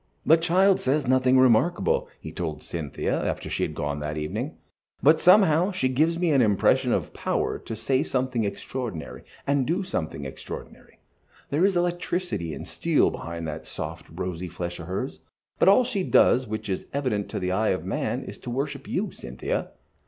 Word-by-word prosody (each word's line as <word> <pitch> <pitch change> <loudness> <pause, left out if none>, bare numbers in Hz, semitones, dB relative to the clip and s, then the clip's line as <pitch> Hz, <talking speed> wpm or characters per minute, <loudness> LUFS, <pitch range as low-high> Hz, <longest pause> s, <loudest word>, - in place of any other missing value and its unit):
"The 160 - +7
child 185 +4 +3
says 140 +2 +1
nothing 130 0 +4
remarkable," 130 +7 +3
he 80 - -8
told 80 -2 -4
Cynthia, 80 -5 -2
after - - -3
she - - -1
had - - -1
gone 75 0 -2
that 75 +1 -4
evening, 75 0 -4 0.5
"but 155 +4 +5
somehow 180 -2 +6
she 180 -10 0
gives 155 +6 +2
me 175 -2 +1
an 135 -3 +4
impression 105 -4 +3
of - - -1
power - - -1
to 115 - -6
say 130 +4 +1
something 130 -4 -1
extraordinary, 100 -2 -5 0.2
and 140 -2 +1
do 175 +5 0
something 80 - -3
extraordinary. 65 0 -9 0.5
There 150 +5 +2
is 195 -2 +3
electricity 175 - -1
and - - -8
steel - - +2
behind 85 0 -6
that 75 0 -6
soft, - - -6
rosy 90 +1 -4
flesh 85 +1 -5
of 80 - -8
hers. 95 +2 -4 0.4
But - - +6
all 225 +6 +6
she 230 -5 -1
does 130 -8 +4
which 110 0 -4
is 95 -2 -3
evident 125 -8 -1
to - - -3
the 90 0 -1
eye 105 +3 +1
of 95 - -1
man - - -2
is - - -9
to - - -7
worship 135 +4 -3
you, - - -1
Cynthia." 60 +1 -4
125 Hz, 180 wpm, -26 LUFS, -, 0.5 s, The